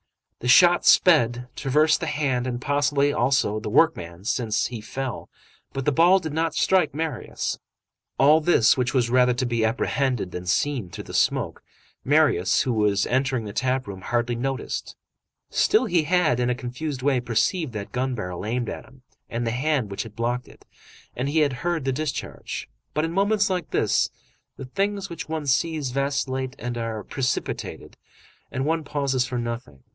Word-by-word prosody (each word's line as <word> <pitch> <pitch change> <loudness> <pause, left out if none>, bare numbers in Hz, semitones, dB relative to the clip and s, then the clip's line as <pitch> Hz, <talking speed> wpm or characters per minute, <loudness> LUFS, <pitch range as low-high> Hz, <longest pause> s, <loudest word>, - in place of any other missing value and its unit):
The 125 - -5
shot 175 +7 +6
sped, 125 -8 +4
traversed 150 +3 +2
the 165 - -3
hand 135 -5 0
and 120 -1 -3
possibly, 145 +1 +1
also, 120 -6 +1
the 105 - -5
workman, 95 - +1
since 110 -1 0
he 120 -3 -5
fell, 130 +3 -5 0.4
but 135 -1 -4
the 150 - +3
ball 170 +6 +5
did 160 -5 -4
not 160 0 0
strike 175 -7 +2
Marius. 155 -5 -3 0.6
All 150 +4 +5
this, 150 -8 +4
which 125 0 -1
was 120 -2 +2
rather 125 -1 +4
to 125 - -1
be 120 -2 0
apprehended 120 -2 0
than 90 0 -6
seen 120 +1 0
through - - -8
the - - -11
smoke, - - 0 0.4
Marius, 140 - +3
who 125 - -1
was 105 -2 +2
entering 130 -2 0
the 105 - -6
tap 130 +2 0
room, 95 -2 -8
hardly 120 +3 -1
noticed. 135 +2 -4 0.6
Still, 430 - +3
he 170 -3 +1
had, 165 -7 +2
in 125 0 +1
a 125 - +1
confused 130 +2 -5
way, 135 -2 +3
perceived 125 - 0
that 100 -2 -6
gun 130 0 -1
barrel 90 -5 -5
aimed 120 +3 -2
at - - -7
him, 130 -1 -20 0.3
and 120 +1 -2
the 115 - 0
hand 130 -3 0
which 100 - -3
had 110 -2 -9
blocked 120 +1 -2
it, - - -18 0.5
and 130 +3 -2
he 155 +2 +2
had 145 -3 +2
heard 170 -5 -1
the 135 - +1
discharge. 150 +2 -4 0.3
But 155 +1 +1
in 165 - -3
moments 200 +2 +2
like 180 -4 -2
this, - - +1 0.5
the 135 - -7
things 195 +8 -2
which 165 -3 -7
one 160 -2 -3
sees 145 0 0
vacillate 135 -1 -2
and 120 0 -4
are 110 -2 -4
precipitated, 130 +3 -3 0.6
and 130 +1 -2
one 160 +1 0
pauses 140 -3 0
for 125 -1 -3
nothing. 115 - -5
130 Hz, 180 wpm, -24 LUFS, 120-150 Hz, 0.6 s, shot